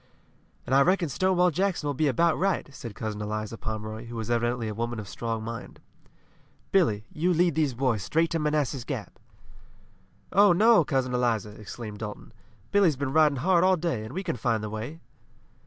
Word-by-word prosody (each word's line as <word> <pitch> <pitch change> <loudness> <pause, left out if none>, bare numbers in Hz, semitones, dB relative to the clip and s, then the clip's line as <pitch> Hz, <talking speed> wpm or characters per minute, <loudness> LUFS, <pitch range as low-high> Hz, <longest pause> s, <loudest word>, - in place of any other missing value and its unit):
"And 125 - -2
I 135 - +6
reckon 180 +1 +2
Stonewall 180 +4 +2
Jackson 185 -1 -1
will 145 - 0
be 150 +3 +1
about 165 +5 +3
right!" 195 +1 0
said 115 -5 -8
Cousin 105 -1 -4
Eliza 110 +1 -4
Pomeroy, 110 0 -5
who 120 - -8
was 115 0 -3
evidently 120 0 0
a 105 - -3
woman 115 +1 -3
of 105 - -7
strong 115 +3 -4
mind. 115 0 -7 0.9
"Billy, 110 - +2
you 175 +4 +1
lead 175 0 +3
these 145 -4 0
boys 120 -4 0
straight 165 - +1
to 165 - 0
Manassas 150 -4 0
Gap." - - -6 1.1
"Oh, 200 -1 +6
no, 215 0 +5
Cousin 130 -3 -1
Eliza!" 115 -4 0
exclaimed 105 0 -8
Dalton. 105 +1 -7 0.4
"Billy's 195 -7 +4
been 135 -1 -2
riding 155 -2 +5
hard 180 -2 +4
all 185 0 +4
day, 160 -10 -2
and 110 - -8
we 190 - -2
can 165 -8 -3
find 115 -1 0
the 105 - -4
way." 115 +9 -6
130 Hz, 185 wpm, -27 LUFS, 110-170 Hz, 1.1 s, I